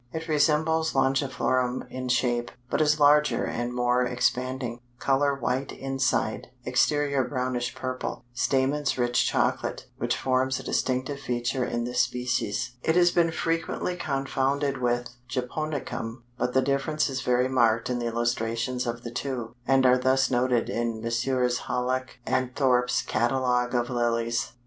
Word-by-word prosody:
It 160 +2 -5
resembles 160 +1 +2
Longiflorum 130 -2 +1
in 130 0 -4
shape, 120 -1 +1 0.2
but - - +1
is 150 0 +3
larger 145 -4 +4
and 120 +1 -3
more 125 0 +2
expanding; 125 0 -1 0.2
color 140 +2 +2
white 130 +1 -2
inside, 135 -4 -1 0.2
exterior 140 +3 +2
brownish 125 -2 -2
purple; 130 -1 -4
stamens 135 +3 +1
rich 120 -1 +2
chocolate, - - 0
which - - 0
forms 130 0 +1
a - - -8
distinctive 130 +2 -1
feature 125 0 -1
in 120 -1 -2
this 125 +1 -2
species. 125 0 -1
It 160 - +1
has 175 -1 +5
been 170 -1 +3
frequently 165 +2 -1
confounded 140 -2 -1
with 120 0 0 0.2
Japonicum, 125 -3 -4
but 125 +1 -2
the 130 - +4
difference 140 +3 0
is 130 -2 -3
very 125 0 +2
marked 115 -3 +2
in 125 -1 -1
the 120 - -2
illustrations 120 +1 -1
of 120 0 -4
the 120 - -6
two, 120 -2 -4
and 135 0 +4
are 125 0 +5
thus 130 +1 +2
noted 125 -1 +2
in 115 -1 -2
Messrs. 125 +2 0
Hallock 130 +1 -2 0.2
& 130 -1 -1
Thorp's 125 -3 +2
"Catalogue 125 +2 +1
of 120 +1 0
Lilies." 120 -1 0
125 Hz, 145 wpm, -26 LUFS, 120-135 Hz, 0.2 s, has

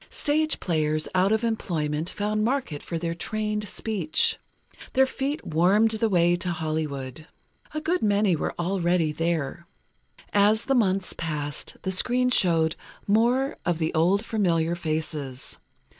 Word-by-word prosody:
Stage 310 +1 0
players 155 -3 0
out 185 +2 +3
of 220 +1 +1
employment 165 -8 -1
found 210 +1 -1
market 240 - -1
for 170 - -4
their 165 0 -2
trained 210 +3 -2
speech. 190 -6 +2 0.5
Their 265 0 +5
feet 275 +3 -3
warmed 190 +8 +3
the 220 0 +1
way 175 -2 +3
to 180 - -2
Hollywood. 155 -3 -4 0.5
A 310 - -2
good 350 +4 0
many 205 -3 +2
were - - -3
already 175 -2 +1
there. 165 0 -2 0.7
As 210 +2 +3
the 270 - +1
months 195 -6 +1
passed, 150 -3 -4
the 190 - -1
screen 250 +6 +2
showed 165 -7 +3 0.3
more 240 +6 +2
of 175 -2 0
the 160 -1 -1
old 185 +7 +2
familiar 170 -7 +1
faces. 155 -5 -4
180 Hz, 140 wpm, -25 LUFS, 160-220 Hz, 0.7 s, Their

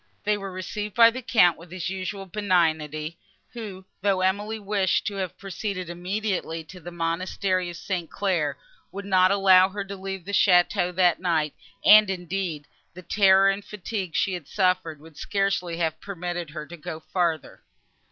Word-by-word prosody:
They 210 +1 +2
were 195 -1 -6
received 205 +3 -5
by 230 -1 +8
the 255 +2 -6
Count 180 -9 +4
with 170 +1 -13
his 180 -1 -5
usual 195 +1 -4
benignity, 165 -5 0 0.3
who, 205 -6 -8 0.2
though 195 -2 +1
Emily 205 +4 0
wished 200 -2 0
to 205 - -2
have 185 -3 -4
proceeded 195 -2 -5
immediately 180 -2 -3
to 180 +4 -12
the 175 - -8
monastery 180 +2 -1
of 170 - -8
St. 175 -2 -4
Claire, 180 -7 -1 0.3
would 200 +1 -7
not 185 -2 +4
allow 190 -1 +6
her 200 +1 -4
to 200 0 -7
leave 195 -2 -6
the 200 - -5
château, 180 -2 +3
that 180 -2 +3
night; 160 -4 0 0.3
and, 215 -1 +8
indeed, 180 -4 -3 0.3
the 185 - -10
terror 195 +1 +5
and 200 +1 -5
fatigue 195 -4 -5
she 195 - +1
had 175 -6 -6
suffered 180 -5 0
would 160 0 -16
scarcely 195 -4 -1
have 160 -2 -2
permitted 175 -3 -5
her 155 0 -7
to 175 +3 -11
go 160 0 -7
farther. 165 -2 -2
185 Hz, 170 wpm, -25 LUFS, 170-200 Hz, 0.3 s, by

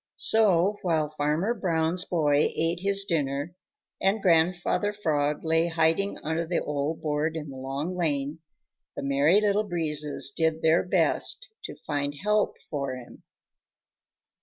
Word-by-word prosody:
So 205 -2 +3
while 160 -4 0
Farmer 155 +8 0
Brown's 175 -4 +1
boy 150 -4 +2
ate 165 +1 0
his 200 +1 +1
dinner, 145 -1 -2 0.5
and 195 +3 +2
Grandfather 175 +3 +2
Frog 150 -7 -1
lay 165 +1 +2
hiding 165 +4 +1
under 160 +2 -2
the 175 - 0
old 150 +2 -3
board 155 +1 -1
in 150 -3 -5
the 135 - -9
Long 135 +7 -4
Lane, 150 -3 -1 0.6
the - - -5
Merry 140 +7 +3
Little 210 0 +2
Breezes 150 -7 -1
did 160 -1 0
their 160 +1 +4
best - - 0 0.2
to - - -7
find 145 -1 -2
help 210 +6 0
for 140 -3 -3
him. 125 -2 -12
160 Hz, 135 wpm, -26 LUFS, 150-180 Hz, 0.6 s, their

